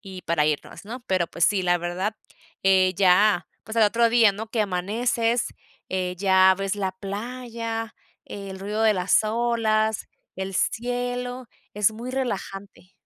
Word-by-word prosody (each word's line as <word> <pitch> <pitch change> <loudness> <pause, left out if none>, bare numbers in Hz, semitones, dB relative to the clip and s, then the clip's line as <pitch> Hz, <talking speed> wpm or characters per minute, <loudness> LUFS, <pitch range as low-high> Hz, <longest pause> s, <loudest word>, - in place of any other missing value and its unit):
y 190 -3 -9
para 160 -3 +1
irnos, 155 +5 -3
¿no?, 240 +4 -6
pero 185 -3 +1
pues 170 - 0
sí, 200 0 +3
la 175 -1 +2
verdad, 180 +5 -3 0.5
eh, 190 -1 +4
ya, 195 +1 +4 0.2
pues 220 +2 -7
al 225 - +5
otro 230 +3 +4
día, 225 -3 +5
¿no?, 220 +3 -6
que 220 -1 0
amaneces, 225 +5 0 0.4
eh, 185 -1 -1
ya 190 0 +5
ves 195 0 -2
la 190 -2 -2
playa, 225 +3 -5 0.3
el 195 -1 -8
ruido 205 +3 -3
de 220 -1 +4
las 180 +2 +3
olas, 220 -1 0 0.3
el 190 0 -4
cielo, 245 +2 -2 0.3
es 210 +1 +2
muy 235 +3 -6
relajante. 200 -7 -5
205 Hz, 150 wpm, -24 LUFS, 190-230 Hz, 0.5 s, al